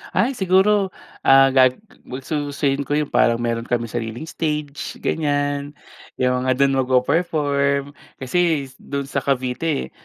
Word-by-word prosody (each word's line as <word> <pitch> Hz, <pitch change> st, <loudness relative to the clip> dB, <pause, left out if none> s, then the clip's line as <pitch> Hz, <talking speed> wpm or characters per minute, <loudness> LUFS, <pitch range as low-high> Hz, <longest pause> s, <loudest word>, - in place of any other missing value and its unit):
Ay 270 Hz, -, +2 dB
siguro, 190 Hz, -1 st, +2 dB, 0.4 s
ah, 135 Hz, 0 st, +7 dB
gag 130 Hz, -1 st, +5 dB, 0.3 s
gustusin 140 Hz, +1 st, -2 dB
ko 145 Hz, -, 0 dB
yung 150 Hz, -1 st, -2 dB
parang 115 Hz, -, +3 dB
meron 115 Hz, -1 st, -2 dB
kaming 115 Hz, -2 st, -1 dB
sariling 115 Hz, +2 st, -4 dB
stage 150 Hz, -3 st, -3 dB
ganyan, 145 Hz, -1 st, -1 dB, 0.4 s
'yung 125 Hz, 0 st, +1 dB
mga -, -, +3 dB
dun 135 Hz, 0 st, +2 dB
magpe-perform. 140 Hz, +1 st, +1 dB, 0.3 s
Kasi 145 Hz, +1 st, 0 dB
do'n 140 Hz, 0 st, -4 dB
sa 140 Hz, 0 st, -2 dB
Cavite, 135 Hz, +3 st, -1 dB
140 Hz, 125 wpm, -21 LUFS, 130-150 Hz, 0.4 s, ah